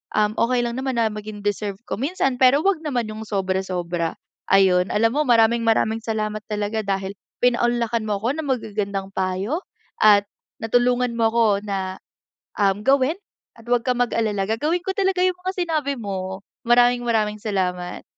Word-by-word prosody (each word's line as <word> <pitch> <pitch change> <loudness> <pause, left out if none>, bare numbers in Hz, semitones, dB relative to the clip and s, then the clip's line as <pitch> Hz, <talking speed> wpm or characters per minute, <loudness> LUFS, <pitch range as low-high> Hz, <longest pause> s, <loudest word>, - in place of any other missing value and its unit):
um, 210 0 +3
okey 245 +1 +2
lang 235 - -2
naman 265 -1 -2
na 230 - +3
maging 210 -1 -8
deserve 205 -1 -2
ko - - -4
minsan 270 -4 -1
pero 270 +5 +5
wag 390 -5 +2
naman 260 -7 -1
yung 215 0 -7
sobra-sobra. 185 -4 -2 0.3
Ayun, 190 -1 +4
alam 225 +2 +2
mo 300 - +1
maraming-maraming 225 -1 +3
salamat 215 -1 -3
talaga 210 +1 -2
dahil 195 -1 -2 0.3
pinaunlakan 240 -2 +1
mo 205 - +1
ako 210 +4 -3
ng 295 - -7
magagandang 200 -5 -2
payo 190 - -1 0.4
at 205 -1 +6 0.3
natulungan 245 +1 +1
mo 230 -1 +2
ako 230 0 +2 0.2
na, 190 -1 -3 0.6
um, 200 -1 +2
gawin 270 - +2 0.4
at 230 - -17
'wag 245 -1 +2
kang 250 -1 +1
mag-alala 215 -4 0
gagawin 305 +10 0
ko 380 +2 -3
talaga 380 -2 +1
yung 365 -1 +2
mga 375 - -1
sinabi 300 -4 0
mo. 190 -2 -5 0.2
Maraming-maraming 240 -3 +3
salamat. 180 -4 -2
225 Hz, 155 wpm, -22 LUFS, 200-245 Hz, 0.6 s, at